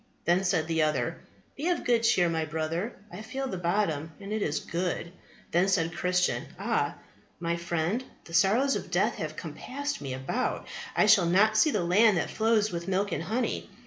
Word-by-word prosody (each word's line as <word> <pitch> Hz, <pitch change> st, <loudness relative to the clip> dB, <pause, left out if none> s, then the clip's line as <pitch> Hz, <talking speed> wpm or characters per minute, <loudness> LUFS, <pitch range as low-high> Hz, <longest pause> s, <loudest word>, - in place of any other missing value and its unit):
Then 175 Hz, +3 st, +3 dB
said 180 Hz, -4 st, +1 dB
the 160 Hz, 0 st, 0 dB
other, 155 Hz, 0 st, 0 dB, 0.4 s
Be 300 Hz, -, -3 dB
of 350 Hz, -, 0 dB
good 235 Hz, -2 st, +3 dB
cheer, 180 Hz, -6 st, +4 dB
my 165 Hz, -1 st, 0 dB
brother, 160 Hz, +7 st, -2 dB, 0.2 s
I 180 Hz, +4 st, -7 dB
feel 265 Hz, +5 st, -4 dB
the 190 Hz, -8 st, -4 dB
bottom, 170 Hz, -4 st, 0 dB
and 200 Hz, +1 st, -6 dB
it 215 Hz, -, -1 dB
is 150 Hz, -5 st, 0 dB
good. 170 Hz, 0 st, -3 dB, 0.4 s
Then 175 Hz, +3 st, +3 dB
said 165 Hz, -4 st, +1 dB
Christian, 180 Hz, 0 st, +1 dB
Ah, -, -, 0 dB, 0.4 s
my 170 Hz, 0 st, -1 dB
friend, 170 Hz, +6 st, -1 dB, 0.2 s
the 165 Hz, -, -12 dB
sorrows 220 Hz, +11 st, +3 dB
of -, -, -5 dB
death -, -, +1 dB
have -, -, -4 dB
compassed 285 Hz, -, -5 dB
me 135 Hz, -2 st, -4 dB
about; 135 Hz, -, -2 dB, 0.3 s
I -, -, +5 dB
shall 205 Hz, -5 st, +6 dB
not 210 Hz, +5 st, +4 dB
see 265 Hz, +8 st, +5 dB
the 210 Hz, -10 st, 0 dB
land 200 Hz, +3 st, +4 dB
that 160 Hz, -, -1 dB
flows 220 Hz, -2 st, +2 dB
with 170 Hz, 0 st, -4 dB
milk 195 Hz, +2 st, 0 dB
and -, -, -1 dB
honey. 220 Hz, +9 st, -2 dB
180 Hz, 190 wpm, -28 LUFS, 170-215 Hz, 0.4 s, shall